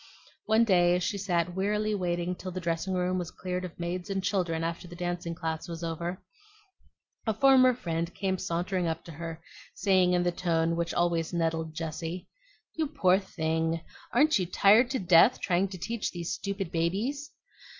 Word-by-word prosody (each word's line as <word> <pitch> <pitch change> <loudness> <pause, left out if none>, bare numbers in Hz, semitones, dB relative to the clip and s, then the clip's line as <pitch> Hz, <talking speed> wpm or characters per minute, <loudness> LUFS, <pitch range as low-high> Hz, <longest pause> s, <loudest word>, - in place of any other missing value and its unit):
One 220 +1 +5
day 175 -5 +4
as 180 - -1
she 200 +2 -1
sat 175 -3 0
wearily 210 +3 0
waiting 175 -2 -1
till 185 +1 -7
the 185 0 -4
dressing 170 +2 -2
room 180 0 0
was 175 -2 -4
cleared 180 0 -4
of 180 -2 -8
maids 175 +2 -3
and 195 -1 -2
children 175 -4 0
after 170 +2 -4
the 175 - -10
dancing 175 -1 -3
class 160 -1 -4
was 170 0 -6
over, 170 +2 -4 1.0
a 220 - +1
former 260 -1 +6
friend 170 -6 -3
came 190 -2 -1
sauntering 180 0 -1
up 160 - -3
to 170 - -10
her, 165 +1 -7 0.3
saying 185 -3 +3
In 175 0 +2
the 175 - +1
tone 165 -2 0
which 170 0 -2
always 170 -1 +1
nettled 160 -2 -1
Jessie, 165 +2 -5 0.5
"You 315 -1 -1
poor 195 -11 +3
thing! 160 -3 -1 0.3
aren't 295 0 +4
you 180 - -1
tired 210 +7 +5
to 265 - -1
death 180 +5 +5
trying 185 +1 +1
to 190 -1 -8
teach 225 +4 -3
these 175 -1 -4
stupid 200 -3 -4
babies?" 215 - -1
180 Hz, 180 wpm, -29 LUFS, 170-195 Hz, 1.0 s, former